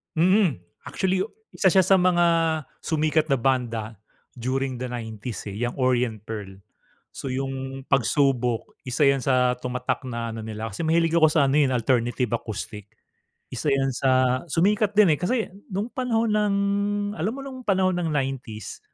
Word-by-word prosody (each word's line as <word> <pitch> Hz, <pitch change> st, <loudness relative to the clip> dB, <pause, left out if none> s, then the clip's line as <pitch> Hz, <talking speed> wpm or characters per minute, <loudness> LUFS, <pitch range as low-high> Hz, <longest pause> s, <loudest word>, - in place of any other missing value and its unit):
Mhm. 180 Hz, -, +3 dB, 0.3 s
Actually, 190 Hz, -1 st, 0 dB, 0.3 s
isa 190 Hz, -, +1 dB
siya 190 Hz, +1 st, +5 dB
sa 190 Hz, +1 st, +5 dB
mga 180 Hz, -1 st, +3 dB, 0.5 s
sumikat 155 Hz, 0 st, +1 dB
na 140 Hz, -, +3 dB
banda 115 Hz, -4 st, -1 dB, 0.4 s
during 130 Hz, +1 st, -2 dB
the 125 Hz, -, -3 dB
90s 115 Hz, -2 st, -6 dB
eh, 100 Hz, -, -7 dB
'yang 120 Hz, +2 st, -2 dB
Orient 125 Hz, -5 st, +1 dB
Pearl. 100 Hz, -3 st, -7 dB, 0.5 s
So -, -, -7 dB
'yung, 135 Hz, 0 st, -4 dB
"Pagsubok" 130 Hz, -3 st, +1 dB
isa 130 Hz, +4 st, 0 dB
'yan 140 Hz, -1 st, +4 dB
sa 125 Hz, -2 st, +2 dB
tumatak 125 Hz, +1 st, -3 dB
na 115 Hz, -2 st, -4 dB
ano 110 Hz, -, -6 dB
nila 110 Hz, 0 st, -5 dB
kasi 130 Hz, +12 st, -4 dB
mahilig 165 Hz, +1 st, +2 dB
ako 155 Hz, -, +6 dB
sa 150 Hz, -3 st, +3 dB
ano 140 Hz, -, +2 dB
eh, 145 Hz, -, +5 dB
'yun 130 Hz, -, -1 dB
alternative 120 Hz, 0 st, +1 dB
acoustic. 105 Hz, -2 st, -7 dB, 0.7 s
Isa 125 Hz, +4 st, -3 dB
'yan 135 Hz, -1 st, +1 dB
sa 130 Hz, -1 st, +2 dB
sumikat 205 Hz, +6 st, +2 dB
din, 200 Hz, -7 st, +6 dB
eh. -, -, -15 dB
Kasi 225 Hz, +6 st, 0 dB, 0.2 s
nung 200 Hz, +4 st, -2 dB
panahon 230 Hz, -4 st, 0 dB
ng 210 Hz, -1 st, +2 dB, 0.6 s
alam 180 Hz, +7 st, -1 dB
mo -, -, -6 dB
nung 265 Hz, -1 st, -8 dB
panahon 190 Hz, -4 st, +2 dB
ng 175 Hz, -2 st, -1 dB
90s, 135 Hz, -7 st, -4 dB
135 Hz, 160 wpm, -24 LUFS, 120-170 Hz, 0.7 s, ako